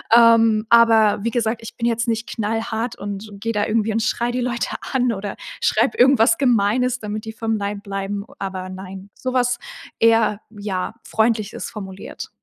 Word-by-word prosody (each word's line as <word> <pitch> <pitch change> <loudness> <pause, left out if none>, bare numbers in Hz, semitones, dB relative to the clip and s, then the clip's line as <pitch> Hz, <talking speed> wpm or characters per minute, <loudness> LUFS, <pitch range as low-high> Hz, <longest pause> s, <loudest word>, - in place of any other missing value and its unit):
Ähm, 230 -2 +6
aber 225 -3 +5
wie 230 - +1
gesagt, 230 -1 -1
ich 225 - -9
bin 235 0 0
jetzt 235 +1 0
nicht 225 -1 -1
knallhart 225 +2 -2
und 205 +1 -6
und 200 -1 -12
gehe 230 +2 -2
da 210 -1 +1
irgendwie 220 -1 +1
und 225 - +1
schreie 240 +2 0
die 250 - -1
Leute 240 -1 -1 0.2
an 250 -2 +2
oder 200 -1 -5 0.3
schreibe 230 +5 +2
irgendwas 260 +4 +5
Gemeines, 250 0 +2
damit 215 0 -5
die 220 - -6
vom 225 0 -1
Leib 200 0 -4
bleiben. 200 0 -4
Aber 185 -1 -4
nein, 190 +1 -9
sowas 250 -1 0 0.4
eher, 225 -2 +3
ja, 205 -2 -4
freundlich 220 -2 0
es - - -5
formuliert. 190 -2 -8
220 Hz, 175 wpm, -21 LUFS, 205-235 Hz, 0.4 s, Ähm